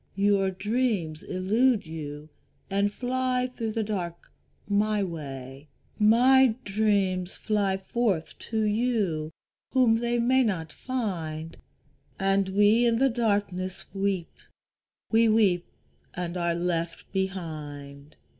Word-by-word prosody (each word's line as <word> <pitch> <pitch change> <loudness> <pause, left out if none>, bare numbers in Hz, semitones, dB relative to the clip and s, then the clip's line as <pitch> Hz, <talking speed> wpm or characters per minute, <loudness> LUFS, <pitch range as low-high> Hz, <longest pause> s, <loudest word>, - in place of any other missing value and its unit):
Your 200 -1 +3
dreams 195 -5 -1
elude 210 +5 +1
you 150 -1 -7 0.4
and 200 +1 +2
fly 255 +1 -1
through 225 -2 -3
the 225 - 0
dark 180 -5 -5 0.4
my 210 0 +1
way, 140 -5 -7 0.3
My 245 +3 +5
dreams 195 -3 +1
fly 200 -3 0
forth 195 -4 -1
to 220 -1 0
you 210 -8 0 0.4
whom 245 -4 +4
they 240 +1 0
may 255 +3 +3
not 165 -9 -2
find; 165 - -4 0.6
And 195 0 +2
we 210 +5 +4
in 230 - +3
the 265 +3 +3
darkness 200 -5 -1
weep, 195 -3 -1 0.8
we 225 0 +5
weep 200 -5 +3 0.5
and 175 0 -3
are 170 -1 0
left 170 -1 -2
behind. 150 -7 -5
200 Hz, 110 wpm, -27 LUFS, 170-225 Hz, 0.8 s, My